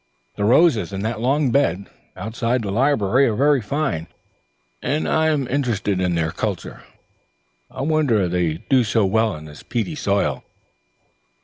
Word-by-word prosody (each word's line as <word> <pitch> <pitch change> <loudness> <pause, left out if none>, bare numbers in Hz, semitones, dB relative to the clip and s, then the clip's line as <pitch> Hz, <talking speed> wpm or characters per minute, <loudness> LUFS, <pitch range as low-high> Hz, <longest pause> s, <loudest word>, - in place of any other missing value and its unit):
"The 100 - -1
roses 125 -1 +4
in 95 0 -4
that 110 0 -2
long 135 +2 +1
bed 100 -9 +1 0.3
outside 115 +2 -2
the 100 - -3
library 130 +1 +2
are 110 - 0
very 140 +2 +3
fine, 105 - -2 0.7
and 150 +2 -1
I 160 0 +2
am 145 -5 0
interested 115 -8 -1
in 90 -1 0
their 80 -2 0
culture. - - -4 0.9
I - - -7
wonder 140 - +2
they 85 -2 0
do 130 -2 +4
so 110 -1 +1
well 110 +1 +1
in 75 0 -10
this 75 -1 -12
peaty 120 +7 -3
soil." 100 - -1
115 Hz, 150 wpm, -21 LUFS, 100-140 Hz, 0.9 s, roses